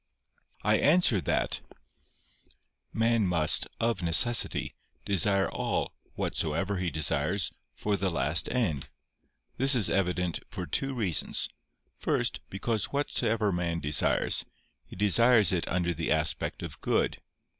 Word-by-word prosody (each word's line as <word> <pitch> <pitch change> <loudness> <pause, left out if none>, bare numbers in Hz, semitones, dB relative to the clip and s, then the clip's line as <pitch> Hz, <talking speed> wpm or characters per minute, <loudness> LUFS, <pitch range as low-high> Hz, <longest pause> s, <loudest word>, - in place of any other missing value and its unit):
I 105 +2 +3
answer 150 - +4
that, - - -1 1.3
Man 115 -2 +1
must, 85 -4 +2
of 115 -4 0
necessity, 115 +8 +3 0.3
desire 100 0 +2
all, - - -3 0.2
whatsoever 85 +6 -2
he 90 -1 -2
desires, 80 +3 +1 0.2
for 105 -1 -1
the 100 -1 -1
last 75 0 +1
end. 90 - -1 0.7
This 135 +2 +4
is 115 -5 +1
evident 90 -2 -1
for 90 -4 -6
two 135 +8 -1
reasons. 100 -10 0 0.5
First, - - -1
because 105 +2 -2
whatever 115 -7 -1
man 85 -2 -2
desires, 75 -1 +2 0.4
he - - -12
desires 105 +1 +4
it 90 -3 -1
under 85 -1 -1
the 80 +1 -3
aspect 80 0 -1
of - - -8
good. - - -1
95 Hz, 120 wpm, -28 LUFS, 85-115 Hz, 1.3 s, answer